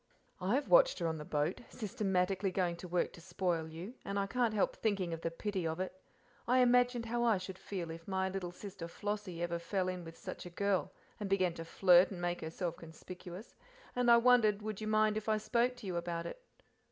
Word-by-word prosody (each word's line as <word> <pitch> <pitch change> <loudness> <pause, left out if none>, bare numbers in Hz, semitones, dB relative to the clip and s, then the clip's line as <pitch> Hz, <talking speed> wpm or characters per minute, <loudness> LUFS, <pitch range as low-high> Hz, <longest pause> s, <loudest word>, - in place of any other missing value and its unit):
"I 190 +5 +1
have 280 +1 0
watched - - +6
her 175 - -2
on 160 -1 -1
the 150 - -7
boat, 150 +5 -1
systematically 195 -4 0
going 180 -2 0
to 180 - -8
work 175 0 0
to 170 - -12
spoil 175 -2 -1
you, 170 +8 -7
and 200 0 -3
can't 240 -3 +1
help 205 - +2
thinking 195 -6 0
of 165 - -5
the 165 - -1
pity 185 +1 -2
of 160 +2 -3
it. 185 0 -2 0.5
I 250 +2 +4
imagined 245 -1 +4
how 240 +1 0
I 230 -4 +4
should 185 0 -7
feel 175 -5 -4
if 165 0 -9
my 190 -1 0
little 190 -2 -3
sister 190 -2 -8
Flossie 205 -2 -4
ever 170 0 -1
fell 185 +2 -1
in 180 -1 -3
with 165 0 -10
such - - -7
a - - -7
girl, 200 +2 0 0.3
and 205 -2 -3
began 185 -3 +2
to 165 0 -7
flirt 180 +1 +6
and 190 - -7
make 175 0 -1
herself 165 +1 -3
conspicuous, 180 +4 -10 0.4
and 245 -1 +2
I 235 - +9
wondered 230 -4 +4
would 215 -1 -4
you 215 - -3
mind 215 0 +3
if 215 0 -3
I 215 - +3
spoke 240 +3 +1
to 245 -3 -11
you 180 -2 -2
about 170 -1 -3
it. - - -7
190 Hz, 220 wpm, -34 LUFS, 175-215 Hz, 0.5 s, I